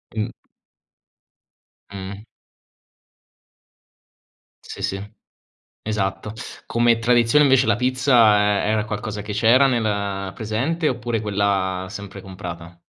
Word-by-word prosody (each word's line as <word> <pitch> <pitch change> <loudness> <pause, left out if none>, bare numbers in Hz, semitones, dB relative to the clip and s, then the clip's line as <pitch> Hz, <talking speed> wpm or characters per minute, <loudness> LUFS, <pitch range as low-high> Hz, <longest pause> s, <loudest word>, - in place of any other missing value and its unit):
Mh. 110 -1 -2 1.6
Mh. 100 +1 -7 2.4
Sì, - - -9
sì, 100 +2 -4 0.7
esatto. 105 0 -3 0.3
Come 120 0 +2
tradizione, 120 +4 +4
invece 135 -1 +4
la - - +3
pizza 125 -3 +4 0.3
e - - 0
era 110 -1 +1
qualcosa 105 0 -5
che 105 0 -6
c'era 115 +6 +5
nel 100 -6 -1
presente, 135 +10 -1
oppure 120 -2 -2
quella 100 -3 -1
sempre 100 0 -8
comprata? 85 -3 -9
105 Hz, 95 wpm, -22 LUFS, 100-120 Hz, 2.4 s, c'era